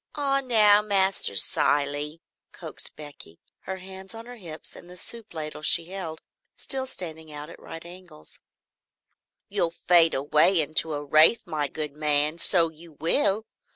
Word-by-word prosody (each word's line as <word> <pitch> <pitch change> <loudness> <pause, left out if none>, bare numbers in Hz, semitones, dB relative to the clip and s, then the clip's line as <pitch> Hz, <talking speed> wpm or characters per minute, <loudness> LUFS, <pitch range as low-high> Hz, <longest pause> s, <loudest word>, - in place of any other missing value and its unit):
"Ah 275 -2 +1
now, 210 -4 +5
Master 195 - +1
Cilley," 145 - +1 0.3
coaxed - - -7
Becky, 145 - -11 0.3
her 190 0 -5
hands 190 +2 -10
on 225 0 -9
her 245 0 -11
hips 165 -6 -8
and 175 - -14
the 180 - -12
soup 230 +4 -7
ladle 155 -2 -6
she 165 +2 +4
still 170 -2 -6 0.5
held 265 -1 +2
standing 160 -7 -8
out 150 +2 -8
at - - -14
right 165 +1 -10
angles, 175 -3 -14 1.1
"you 200 -1 -2
will 170 - +4
fade 170 -1 +3
away 150 +6 +3
into 155 +1 +3
a 145 0 -5
wraith, 155 +10 +5
my 155 -5 -2
good 150 0 -6
man, 150 +1 0
so 170 -3 +4
you 160 +1 -14
will! 195 - +1
165 Hz, 155 wpm, -25 LUFS, 150-195 Hz, 1.1 s, now